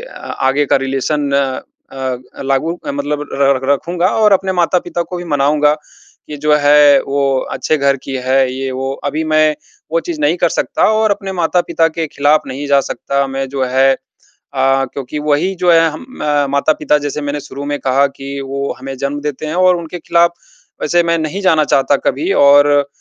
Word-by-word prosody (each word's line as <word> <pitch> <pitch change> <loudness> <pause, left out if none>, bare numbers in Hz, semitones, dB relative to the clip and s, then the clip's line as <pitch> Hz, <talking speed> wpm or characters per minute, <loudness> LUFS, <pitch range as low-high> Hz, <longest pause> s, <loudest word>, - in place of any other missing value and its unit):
आगे 135 +2 -1
का - - +6
रिलेशन 140 +2 -1
अ, 135 - -4
लागू 135 +5 0
अ, - - -2
मतलब 145 +1 -3
र 140 0 +3
र 140 - +2
रखूँगा 170 +5 -1 0.2
और 210 - +6
अपने 190 0 +1
माता-पिता 175 -1 0
को 180 - -3
भी 175 - -6
मनाऊँगा 150 +1 +3 0.5
कि 150 - -7
जो 150 +1 +1
है, 145 -1 +5
वो 140 -1 0
अच्छे 155 - 0
घर 140 -1 +2
की 135 - -5
है, 130 0 +2
ये 135 0 -4
वो। 135 +1 -3 0.2
अभी 155 +3 -2
मैं 155 0 +3 0.4
वो 165 - +2
चीज़ 170 -3 -4
नहीं 150 +4 +2
कर - - +2
सकता - - -1
और 220 -1 +2
अपने 195 -1 -3
माता-पिता 175 -1 +1
के 160 0 -4
खिलाफ़ 150 +1 +1
नहीं 140 +3 -5
जा 140 -1 +4
सकता। 140 +1 -2
मैं 135 0 -3
जो 135 -1 -2
है 130 +1 +3 0.6
अ, 135 0 +2
क्योंकि 140 +2 -5
वही 150 +6 0
जो 180 -1 +1
है, 165 - +6
हम 155 +12 -9 0.2
म 145 -1 +1
माता-पिता, 150 +1 +1
जैसे 145 +1 -4
मैंने 145 0 -3
शुरू 140 0 -8
में 145 0 -2
कहा 135 +2 +2
कि 140 0 -7
वो 140 +1 -3
हमें 135 +1 -7
जन्म 140 +1 -3
देते 150 +1 -4
हैं 155 - -4
और 185 0 +4
उनके 170 +1 -7
खिलाफ़ 170 +1 +2 0.5
वैसे 175 0 +2
मैं 170 0 0
नहीं 160 +5 -3
जाना 160 -5 +3
चाहता 140 0 +2
कभी।" 355 +5 0
और 145 0 +5
145 Hz, 190 wpm, -15 LUFS, 135-165 Hz, 0.6 s, का